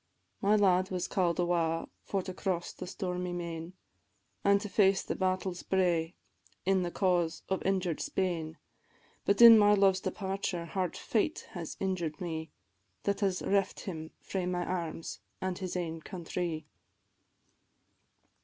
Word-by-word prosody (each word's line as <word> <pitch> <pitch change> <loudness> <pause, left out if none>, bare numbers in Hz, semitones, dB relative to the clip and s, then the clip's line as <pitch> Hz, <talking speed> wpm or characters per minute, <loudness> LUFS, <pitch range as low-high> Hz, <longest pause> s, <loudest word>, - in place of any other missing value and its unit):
My 205 +1 +4
lad 185 -2 +4
was 180 -2 -2
call'd 175 -3 +1
awa 170 -2 +1
for 195 -2 -2
to 185 - -5
cross 180 -2 -2
the - - -7
stormy 180 -1 -3
main, 170 0 -5 0.7
An' 200 0 +5
to 205 +1 -4
face 195 -1 +3
the - - -2
battle's 185 -1 -1
bray 175 -3 +1 0.5
in 190 0 +3
the 175 - -1
cause 175 -3 +1
of 190 - 0
injured 185 -4 0
Spain; 165 -4 -2 0.7
But 200 +3 +5
in 230 -1 +11
my 205 0 +6
love's 195 -1 +4
departure 190 -3 -3
hard 180 +1 -2
fate 235 +7 0
has 175 -6 -6
injured 180 -5 -2
me, 160 -2 -4 0.5
That 200 0 0
has 195 -3 0
reft 195 -1 +1
him 160 -4 -6
frae 185 -2 -3
my 175 -1 -1
arms, 170 -3 -4 0.2
an' 185 -1 -2
his 185 -2 -4
ain 165 -2 -3
countrie. 170 -2 -4
180 Hz, 145 wpm, -31 LUFS, 170-195 Hz, 0.7 s, in